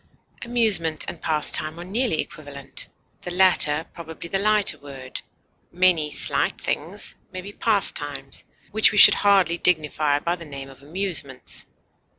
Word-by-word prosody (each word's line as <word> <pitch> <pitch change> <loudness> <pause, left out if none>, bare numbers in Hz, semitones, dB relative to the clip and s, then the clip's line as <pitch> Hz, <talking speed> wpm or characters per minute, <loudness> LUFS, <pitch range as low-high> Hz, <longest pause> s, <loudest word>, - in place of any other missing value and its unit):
Amusement 210 -10 +2
and - - -8
pastime 155 +1 +2
are - - -7
nearly 210 -1 0
equivalent, 140 -3 -8 0.3
the - - -6
latter 175 -4 +3
probably 165 0 -9
the 195 - 0
lighter 210 0 +2
word; 135 -2 -9 0.5
many 175 -4 +2
slight - - 0
things - - -2 0.2
may 185 - -6
be 200 +2 -10
pastimes 145 -11 -1 0.3
which 220 +1 +4
we 210 - -3
should - - +9
hardly 195 -4 +2
dignify 155 -3 +1
by 170 +4 -2
the 170 - -10
name 140 -3 -9
of 135 - -17
amusements. 150 -4 -2
165 Hz, 140 wpm, -22 LUFS, 145-195 Hz, 0.5 s, should